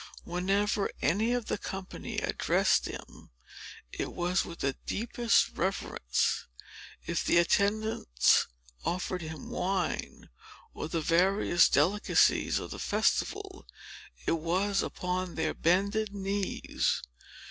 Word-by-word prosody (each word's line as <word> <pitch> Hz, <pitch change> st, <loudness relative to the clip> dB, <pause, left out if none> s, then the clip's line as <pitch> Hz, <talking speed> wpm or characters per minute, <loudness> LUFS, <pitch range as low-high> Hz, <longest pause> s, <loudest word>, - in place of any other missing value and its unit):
Whenever 195 Hz, +4 st, 0 dB
any 205 Hz, -, +2 dB
of 245 Hz, -2 st, 0 dB
the -, -, -2 dB
company 190 Hz, -1 st, -6 dB
addressed -, -, +2 dB
him, -, -, -10 dB, 0.6 s
it -, -, -4 dB
was 180 Hz, +2 st, 0 dB
with 170 Hz, -, -8 dB
the 135 Hz, 0 st, 0 dB
deepest 235 Hz, +1 st, +2 dB
reverence. 170 Hz, -, -1 dB, 0.6 s
If 170 Hz, 0 st, -1 dB
the -, -, +3 dB
attendants 200 Hz, -, +3 dB, 0.4 s
offered 180 Hz, 0 st, -2 dB
him 160 Hz, -3 st, -7 dB
wine, 190 Hz, -, -2 dB, 0.4 s
or -, -, -5 dB
the 165 Hz, -1 st, -1 dB
various 175 Hz, +3 st, +4 dB
delicacies 180 Hz, +9 st, +3 dB
of -, -, -5 dB
the -, -, -6 dB
festival, 395 Hz, -1 st, -1 dB, 0.6 s
it 165 Hz, -, +1 dB
was 190 Hz, +5 st, +1 dB
upon 180 Hz, -1 st, -3 dB
their 160 Hz, -1 st, 0 dB
bended 200 Hz, +4 st, +1 dB
knees. 195 Hz, 0 st, -1 dB
185 Hz, 110 wpm, -30 LUFS, 170-205 Hz, 0.6 s, various